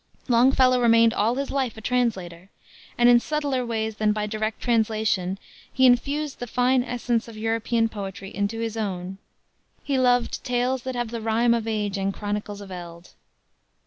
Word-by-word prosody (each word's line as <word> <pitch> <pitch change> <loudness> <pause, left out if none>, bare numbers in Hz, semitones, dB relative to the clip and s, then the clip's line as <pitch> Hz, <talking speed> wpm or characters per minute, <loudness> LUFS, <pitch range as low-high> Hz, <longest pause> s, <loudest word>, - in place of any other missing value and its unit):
Longfellow 255 +1 +4
remained 230 -1 +5
all 225 +3 +1
his 275 +1 -3
life 260 -5 -1
a - - -8
translator, 195 -8 -2 0.5
and 240 - +5
in 240 0 +7
subtler 285 -2 -1
ways 220 -2 -3
than 210 -1 +2
by 210 0 -2
direct 215 +1 -3
translation 215 -5 0 0.3
he 260 - +3
infused 280 +4 +1
the 245 - -5
fine 250 +2 +2
essence 240 -1 -2
of 225 -2 -11
European 225 +1 0
poetry 195 -2 -7
into 205 +3 -2
his 225 -1 -3
own. 190 -3 -4 0.6
He 275 -2 0
loved 245 -1 +1
"Tales 250 +1 0
that 260 -1 -3
have 240 -2 -3
the 230 -1 -4
rime 225 +2 +2
of 230 -1 -2
age 210 -3 -2
And 195 0 0
chronicles 205 0 -5
of 195 -1 -10
eld." 175 -1 -10
225 Hz, 170 wpm, -24 LUFS, 210-245 Hz, 0.6 s, in